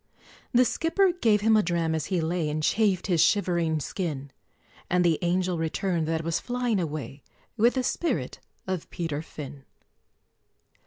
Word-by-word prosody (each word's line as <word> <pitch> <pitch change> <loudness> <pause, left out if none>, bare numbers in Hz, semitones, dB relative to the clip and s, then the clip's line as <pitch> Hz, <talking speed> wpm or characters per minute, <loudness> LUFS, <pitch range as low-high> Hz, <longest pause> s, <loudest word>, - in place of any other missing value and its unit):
The 250 0 +5
skipper 330 - +2
gave 225 - +2
him 220 +1 +4
a 215 - +5
dram, 170 -3 0
as 160 -3 -2
he 185 -3 0
lay, 160 -1 -1
And 155 +1 -2
chafed 200 -1 +2
his 175 -5 +2
shivering 170 -6 +2
skin; 145 -3 -4 0.6
And 180 0 +2
the 165 -3 +3
Angel 180 0 0
returned 165 0 -1
that 160 0 -1
was 165 0 0
flying 245 -4 -1
away 150 -4 -4 0.3
With 235 +3 +3
the 260 - 0
spirit 335 +6 -2 0.3
of 185 -3 -4
Peter 160 -4 -3
Fin! 145 -3 -9
175 Hz, 155 wpm, -27 LUFS, 160-210 Hz, 0.6 s, The